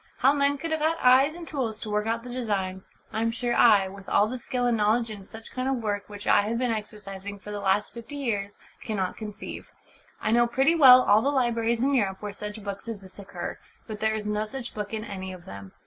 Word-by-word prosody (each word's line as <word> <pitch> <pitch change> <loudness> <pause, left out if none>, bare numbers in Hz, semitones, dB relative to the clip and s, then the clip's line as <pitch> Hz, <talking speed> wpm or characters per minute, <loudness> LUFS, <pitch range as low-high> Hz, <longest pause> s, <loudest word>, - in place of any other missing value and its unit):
How 270 +2 +4
men 285 0 +2
could 330 +3 -5
have 315 - 0
had 320 +2 +1
eyes 265 +5 +5
and 340 -1 -9
tools 235 -7 -3
to 215 - -3
work 210 +1 0
out 230 +1 -1
the 250 - -8
designs, 195 -6 -3 0.2
I 220 - -1
am 230 - +2
sure 240 +1 -1
I, 205 -6 +6
with 195 0 -10
all 205 - +4
the 250 +3 -5
skill 250 0 -2
and 240 -1 +3
knowledge 220 +2 +2
in 200 -2 -9
such 225 +2 -11
kind 255 +1 -2
of 270 - +1
work 205 -1 -2
which 205 0 -9
I - - +5
have 220 +3 -2
been 250 -1 0
exercising 205 -2 -6
for 210 +1 -10
the 205 - -4
last 200 +1 +1
fifty 235 +5 -9
years, 205 -8 -2 0.3
cannot 195 -4 -2
conceive. 210 -1 -8 0.5
I 215 - -1
know 240 +1 +4
pretty 270 +6 +3
well 255 -6 +9
all 210 +2 +5
the 275 - +1
libraries 235 -3 +1
in 280 +1 +2
Europe 200 -7 +1
where 205 -1 -6
such 210 +1 -7
books 200 +2 -6
as 225 -3 -5
this 190 +1 -14
occur, 200 - -6 0.3
but 215 -2 -7
there 220 0 +1
is 215 -1 -4
no 210 0 -1
such 245 +2 -6
book 210 -1 -5
in 220 -1 -4
any 190 -3 -6
of 180 -2 -12
them. 100 -1 -9
220 Hz, 245 wpm, -26 LUFS, 205-250 Hz, 0.5 s, well